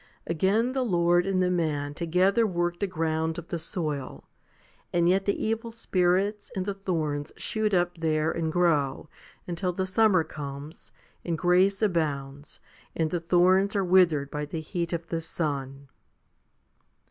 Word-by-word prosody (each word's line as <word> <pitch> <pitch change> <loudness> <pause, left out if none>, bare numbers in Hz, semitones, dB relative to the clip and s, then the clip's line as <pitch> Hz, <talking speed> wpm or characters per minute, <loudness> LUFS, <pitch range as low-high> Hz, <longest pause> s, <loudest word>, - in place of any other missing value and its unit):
Again 195 +9 +1
the 265 - 0
Lord 175 -5 +2
and 185 -1 +2
the 180 - +1
man 150 -5 -1
together 185 +8 +2
work 175 -2 -1
the 200 - 0
ground 160 -2 -1
of 170 -1 -8
the 170 - -3
soul, 155 -5 -4 0.7
and 170 -1 +2
yet 190 +2 +2
the 200 - 0
evil 225 +1 -1
spirits 200 -1 0
and 185 -1 -2
the 200 - -2
thorns 155 -7 -2
shoot 215 -1 -1
up 175 -2 +1
there 155 -1 +1
and 160 -1 -2
grow, 155 -5 +1 0.4
until 180 +1 -2
the 190 +1 -1
summer 185 -2 +3
comes, 145 0 -8 0.3
and 170 -2 -2
grace 185 +5 +3
abounds, 145 -6 -2 0.4
and 160 -1 0
the 175 - 0
thorns 185 +4 +3
are 195 -2 +1
withered 170 -6 +3
by 150 0 -3
the 155 +2 -4
heat 170 +2 -3
of 170 -1 -3
the 165 -1 -2
sun. 140 -4 -4
175 Hz, 155 wpm, -27 LUFS, 155-190 Hz, 0.7 s, summer